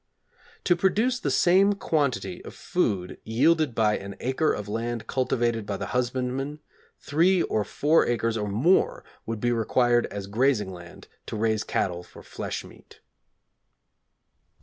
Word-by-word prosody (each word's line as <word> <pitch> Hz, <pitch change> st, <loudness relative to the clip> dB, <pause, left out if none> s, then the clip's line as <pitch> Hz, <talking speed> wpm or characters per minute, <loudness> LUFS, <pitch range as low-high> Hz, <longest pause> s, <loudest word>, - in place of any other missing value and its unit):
To 175 Hz, -, +3 dB
produce 215 Hz, +8 st, +1 dB
the -, -, -2 dB
same 195 Hz, +3 st, +4 dB
quantity 160 Hz, -2 st, -1 dB
of -, -, -10 dB
food 105 Hz, -, -1 dB
yielded 145 Hz, +3 st, +2 dB
by 105 Hz, -2 st, +2 dB
an 100 Hz, 0 st, -8 dB
acre 130 Hz, +5 st, +1 dB
of 105 Hz, -, -4 dB
land 115 Hz, +2 st, -3 dB
cultivated 120 Hz, -4 st, -1 dB
by 100 Hz, -, -2 dB
the -, -, -4 dB
husbandman, 125 Hz, +3 st, -2 dB, 0.4 s
three 170 Hz, +4 st, +2 dB
or 105 Hz, -, 0 dB
four 150 Hz, +9 st, +2 dB
acres, 115 Hz, -1 st, 0 dB
or 105 Hz, -2 st, -2 dB
more, 125 Hz, -, +2 dB, 0.2 s
would 115 Hz, -1 st, -3 dB
be 120 Hz, +2 st, +1 dB
required 120 Hz, +1 st, +2 dB
as 100 Hz, -1 st, -6 dB
grazing 105 Hz, -2 st, +1 dB
land 85 Hz, -1 st, -12 dB, 0.2 s
to -, -, -5 dB
raise 110 Hz, 0 st, +1 dB
cattle 90 Hz, -2 st, -1 dB
for -, -, -15 dB
flesh -, -, -5 dB
meat. -, -, -16 dB
120 Hz, 145 wpm, -26 LUFS, 110-155 Hz, 0.4 s, same